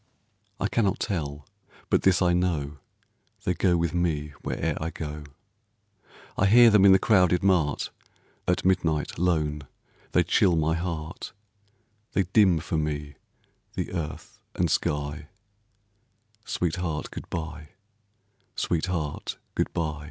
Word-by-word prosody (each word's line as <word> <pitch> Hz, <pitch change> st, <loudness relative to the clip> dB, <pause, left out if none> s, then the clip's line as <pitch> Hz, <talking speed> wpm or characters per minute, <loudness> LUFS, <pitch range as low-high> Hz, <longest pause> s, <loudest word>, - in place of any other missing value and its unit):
I 105 Hz, -, +1 dB
cannot 100 Hz, -3 st, +1 dB
tell, 75 Hz, -8 st, -3 dB, 0.4 s
but -, -, +4 dB
this 95 Hz, 0 st, +4 dB
I 90 Hz, -1 st, +3 dB
know 80 Hz, -5 st, -1 dB, 0.6 s
They 90 Hz, -, +1 dB
go 90 Hz, 0 st, +2 dB
with 85 Hz, -1 st, 0 dB
me 75 Hz, -4 st, -1 dB
where'er 80 Hz, -2 st, -2 dB
I 80 Hz, -, -1 dB
go, 75 Hz, -2 st, -6 dB, 1.1 s
I 100 Hz, -, +3 dB
hear 120 Hz, +3 st, +8 dB
them 105 Hz, -2 st, +6 dB
in 100 Hz, -, +8 dB
the 95 Hz, -, +8 dB
crowded 90 Hz, -4 st, +3 dB
mart, 85 Hz, -7 st, +2 dB, 0.6 s
At 90 Hz, 0 st, +1 dB
midnight 80 Hz, -6 st, +1 dB
lone, 75 Hz, -5 st, 0 dB, 0.5 s
they -, -, +4 dB
chill 90 Hz, -3 st, +3 dB
my 80 Hz, 0 st, +1 dB
heart 80 Hz, -2 st, -4 dB, 0.8 s
They 100 Hz, -, +3 dB
dim 95 Hz, -1 st, +4 dB
for 80 Hz, -, -2 dB
me 75 Hz, -1 st, -3 dB, 0.6 s
the -, -, -3 dB
earth 80 Hz, -4 st, -5 dB, 0.2 s
and 85 Hz, -3 st, +1 dB
sky, 75 Hz, +1 st, -1 dB, 1.2 s
Sweetheart, 85 Hz, -6 st, -2 dB
good -, -, -8 dB
by, 80 Hz, -2 st, -5 dB, 0.9 s
sweetheart 85 Hz, -3 st, -2 dB, 0.2 s
good -, -, -1 dB
by. 80 Hz, -3 st, -2 dB
85 Hz, 125 wpm, -26 LUFS, 75-90 Hz, 1.2 s, hear